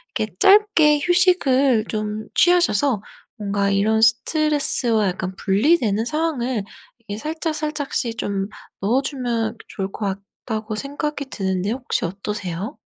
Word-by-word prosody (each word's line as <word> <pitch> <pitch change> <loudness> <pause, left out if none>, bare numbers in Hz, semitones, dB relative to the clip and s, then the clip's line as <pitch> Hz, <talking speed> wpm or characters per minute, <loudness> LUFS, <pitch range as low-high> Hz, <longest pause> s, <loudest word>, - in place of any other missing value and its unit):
이렇게 - - -3
짧게 390 -7 +5
휴식을 280 - +3
좀 215 0 -3
취하셔서 290 - +3 0.4
뭔가 200 -1 0
이런 215 +3 +2
스트레스와 240 -2 +2
약간 185 +1 -4
분리되는 220 - +2
상황을 260 -7 -1 0.4
이렇게 205 -1 -4
살짝살짝씩 300 -5 -3
좀 195 -2 -2 0.3
넣어 230 +7 +2
주면 240 -5 -2
또 - - -16
좋을 195 0 -4
것 210 - -5 0.4
같다.'고 220 -2 -3
생각이 285 +3 -4
드는데 190 0 -1
혹시 250 -5 -2
어떠세요? 195 - -5
230 Hz, 295 characters per minute, -21 LUFS, 205-300 Hz, 0.4 s, 짧게